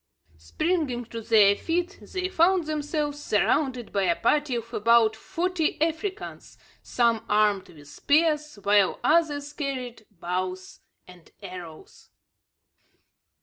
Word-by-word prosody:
Springing 265 - -2
to 230 0 -7
their 210 -3 +5
feet 350 - -2
they 370 -1 -4
found 365 -1 +2
themselves 295 -1 -3
surrounded 245 +3 0
by 200 - +1
a 175 -3 +2
party 290 - +1
of 230 -1 -6
about 225 0 +4
forty 340 +7 -2
Africans, 330 +6 -4 0.2
some 235 -2 +1
armed 210 -2 +2
with 145 -3 -15
spears, 300 - +1
while 200 -1 +3
others 295 -3 +1
carried 255 -7 -5
bows 185 0 -5 0.3
and 180 -2 -16
arrows. 180 -4 -11
245 Hz, 110 wpm, -26 LUFS, 205-310 Hz, 0.3 s, their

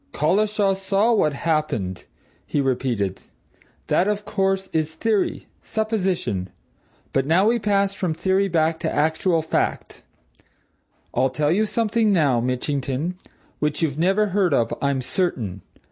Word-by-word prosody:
"Collishaw 200 +5 +2
saw 195 +4 +1
what 155 -9 +2
happened?" 140 - -2 0.4
he - - -1
repeated. 120 -8 -1 0.6
"That, 185 - +2
of 210 0 -1
course, 195 -2 0
is 160 0 -1
theory 220 -4 0 0.2
supposition. 190 - -1 0.6
But 135 0 +1
now 175 +5 +4
we 235 +1 +2
pass 200 -2 +1
from 180 -4 -2
theory 190 +3 +1
back 160 -2 +1
to - - -2
actual 160 +2 +1
fact. 160 - -2 1.1
I'll 130 - +2
tell 145 +4 0
you 215 +5 +2
something 225 -1 +1
now, 145 -10 +3
Mitchington, 135 +5 -2 0.5
which 150 +2 -1
you've 150 -2 -1
never 195 +5 +2
heard 185 -5 +2
of, 115 -1 +1
I'm 140 -2 +1
certain. 120 - -2
165 Hz, 130 wpm, -23 LUFS, 140-200 Hz, 1.1 s, now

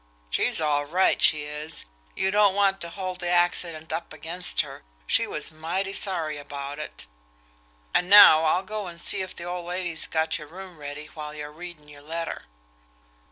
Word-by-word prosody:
She's - - +2
all 145 -2 +1
right, 180 +6 +2
she 155 -4 +5
is. 150 +2 -5 0.3
You 190 - +1
don't 205 -1 +4
want 195 -1 +2
to 170 - -3
hold 185 0 -5
the 175 - -2
accident 175 -2 0
up 170 - -4
against 175 +3 -2
her, - - -9 0.2
she - - +2
was - - -2
mighty 175 +5 -3
sorry 165 -8 +1
about 140 0 -6
it. 150 - -6 0.9
And 180 - +2
now 165 -6 +9
I'll 175 +4 +2
go 210 0 -5
and 170 -1 -9
see 195 +3 -1
if 185 0 -6
the - - -7
old 175 0 -5
lady's 175 -2 -2
got 160 0 0
your 150 - -10
room 180 +1 -10
ready 145 +1 -6
while 150 -1 -7
you're 150 0 -6
readin' 165 -1 -10
your 145 -1 -13
letter." 165 +3 -5
170 Hz, 180 wpm, -26 LUFS, 150-185 Hz, 0.9 s, now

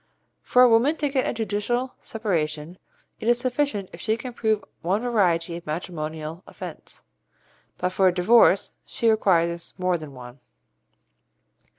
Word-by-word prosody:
For 250 - +4
a - - +8
woman 240 +7 +4
to 290 - 0
get 265 -2 0
a - - +1
judicial 225 +3 -2
separation, 165 -6 -3 0.4
it 220 - -5
is 240 0 +4
sufficient 245 -5 -1
if 170 - -9
she 220 0 0
can 250 +1 -7
prove 220 -3 0 0.2
one 190 +7 0
variety 175 -8 +1
of 170 - -12
matrimonial 155 0 -5
offence, - - -9 0.7
but 180 - 0
for 185 +1 +3
a - - +5
divorce 195 +2 +4
she 230 -1 +1
requires 170 -5 +1
more 180 -2 0
than 150 -3 -10
one. 125 +1 -11
195 Hz, 150 wpm, -24 LUFS, 170-230 Hz, 0.7 s, a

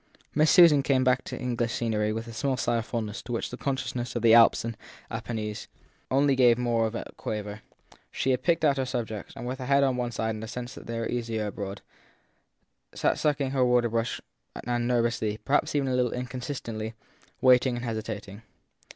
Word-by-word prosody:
Miss 155 +1 +4
Susan 165 -6 +7
came 135 -2 +2
back 130 0 +2
to - - -5
English 120 -2 -1
scenery 110 -2 0
with 115 +2 -4
a 115 - -8
small 130 +3 -1
sigh 120 -2 +1
of 115 - -6
fond 115 -2 -2
ness 105 +1 -6
to 120 - -9
which 115 - -2
the - - -4
consciousness 125 -2 -3
of 120 -1 -1
Alps 115 0 +6
and 115 -1 -4 0.4
Apennines 110 -2 -4 0.4
only 140 +1 +3
gave 120 -3 +5
more 120 -2 +1
of 110 - -6
a - - -6
quaver; 105 0 -5 0.5
she 130 - -1
had 125 - +1
picked 165 -2 +2
out 140 -2 +3
her 135 - 0
subjects 115 -5 -4
and, 120 - -7
with 130 +2 -4
her 130 - -5
head 140 0 +4
on 130 -2 +1
one 120 -1 -2
side 110 0 -1
and 110 0 -7
a - - -5
sense 120 +2 -6
that - - -11
they 115 0 -4
were 115 - -2
easier 115 -3 -2
abroad, 100 -1 -6 1.1
sat - - +1
sucking 145 -3 +1
her 135 -2 +2
water 125 -1 +3
colour - - -8
brush 115 0 -1 0.5
and 120 0 0
nervously 115 -3 0
perhaps 145 +2 +1
even 140 -2 +1
a 130 - 0
little 125 -1 +1
inconsistently 125 -3 -5 0.4
waiting 125 0 +5
and 120 +1 -4
hesitating. 110 -2 -5
120 Hz, 205 wpm, -27 LUFS, 115-130 Hz, 1.1 s, Susan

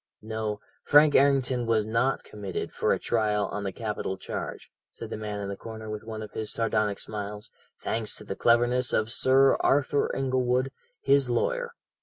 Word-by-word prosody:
"No; 110 -1 -3 0.2
Frank 145 0 +6
Errington 130 -3 +3
was 110 -2 +2
not 115 +5 0
committed 100 -3 -5
for - - +1
trial 105 -3 0
on 105 - -4
the 100 - -2
capital 105 -4 -4
charge," - - -6 0.2
said - - -9
the - - -2
man 105 -1 -4
in 100 - -4
the 100 - -4
corner 110 0 -8
with 105 0 -5
one 110 -1 -6
of 105 - -9
his 110 -1 -3
sardonic 105 -3 0
smiles, 105 -1 -6 0.3
"thanks 110 -2 -2
to - - -8
the 95 - -5
cleverness 120 +2 +3
of 110 +1 +1
Sir 135 +2 +4
Arthur 140 +1 +2
Inglewood, 130 0 +1 0.3
his 140 -2 +3
lawyer. 475 - 0
115 Hz, 170 wpm, -27 LUFS, 105-130 Hz, 0.3 s, Frank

